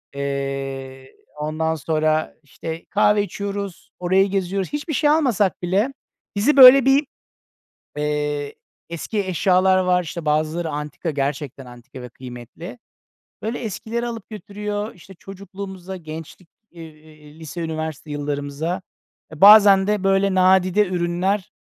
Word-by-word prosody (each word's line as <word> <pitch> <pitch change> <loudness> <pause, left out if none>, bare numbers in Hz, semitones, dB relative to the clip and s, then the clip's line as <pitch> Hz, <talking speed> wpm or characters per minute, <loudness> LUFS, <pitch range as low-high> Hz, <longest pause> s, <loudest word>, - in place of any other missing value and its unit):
Eee, 135 -1 -5 0.2
ondan 155 +2 -2
sonra, 155 +1 0
işte, 160 +3 -8
kahve 210 0 +3
içiyoruz, 200 -1 -6
orayı 190 +2 +2
geziyoruz. 195 -1 -2
Hiçbir 295 +2 -3
şey 295 +1 +2
almasak 255 - +2
bile 195 +9 0 0.4
bizi 265 +9 +2
böyle 260 0 +10
bir, 275 +2 +3 0.9
eee, 150 -1 -2 0.3
eski 170 +6 -4
eşyalar 185 +1 +3
var. 180 -1 +2
İşte, 170 0 -7
bazıları 155 +2 0
antika, 150 +3 -4
gerçekten 140 -1 -3
antika 120 +1 -12
ve 125 - -9
kıymetli. 125 - -10 0.6
Böyle 225 +3 -3
eskilere 230 +2 -4
alıp 230 -3 -7
götürüyor. 210 +1 -5
İşte, 185 +2 -15
çocukluğumuza, 190 0 -9
gençlik, 160 +2 -10 0.2
eee, 155 -2 -14
lise, 165 +2 -7
üniversite 160 -2 -5
yıllarımıza. 145 +4 -3 0.5
,E 155 - -11
bazen 200 -1 +8
de, 210 -2 0
böyle, 195 0 +2
nadide 185 +2 +4
ürünler, 180 +2 -1
175 Hz, 120 wpm, -21 LUFS, 150-200 Hz, 0.9 s, böyle